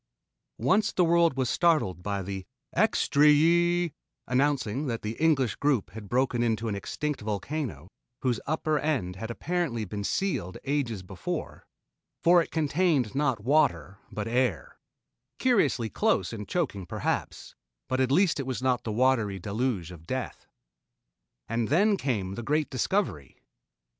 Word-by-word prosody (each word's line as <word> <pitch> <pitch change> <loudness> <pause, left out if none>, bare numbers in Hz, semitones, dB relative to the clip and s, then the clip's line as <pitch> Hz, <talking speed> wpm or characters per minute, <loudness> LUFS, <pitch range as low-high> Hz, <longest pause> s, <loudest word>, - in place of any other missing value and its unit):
Once 210 +3 +2
the 180 - +2
world 170 -3 +3
was 130 -2 +1
startled 150 - +2
by 100 +1 -2
the 95 0 -5 0.3
"extree 150 +1 +4
ee 170 +1 +3 0.2
" - - -55
announcing 135 0 0
that 115 -2 -3
the 105 - -2
English 135 -9 +3
group 135 -11 +1
had 105 0 -9
broken 125 -1 +1
into 115 -1 0
an 110 - -1
extinct 150 +8 -3
volcano, 105 - -4 0.4
whose 125 -4 +1
upper 155 0 0
end 135 -13 -1
had 110 +3 -5
apparently 130 -4 -2
been 100 +1 -5
sealed 135 - -1
ages 130 -9 -1
before, 95 -1 -6 0.6
for 175 +1 +6
it - - -5
contained 155 - +1
not 135 -6 0
water 100 - +1
but 105 0 -4
air 120 -6 -1 0.6
curiously 175 - +2
close 95 -1 0
and 105 -3 -6
choking 100 - -2
perhaps, - - -3 0.3
but 130 - -1
at 130 0 +2
least 180 +1 +3
it 135 - -3
was 130 - -2
not 125 -2 +1
the 110 - -3
watery 115 -4 +2
deluge 100 -2 -2
of 85 -2 -13
death. 130 +2 -4 1.0
And 115 0 -1
then 200 +8 +3
came 105 - -2
the 120 - -5
great 150 +5 0
discovery. 130 - -1
130 Hz, 150 wpm, -28 LUFS, 105-150 Hz, 1.0 s, for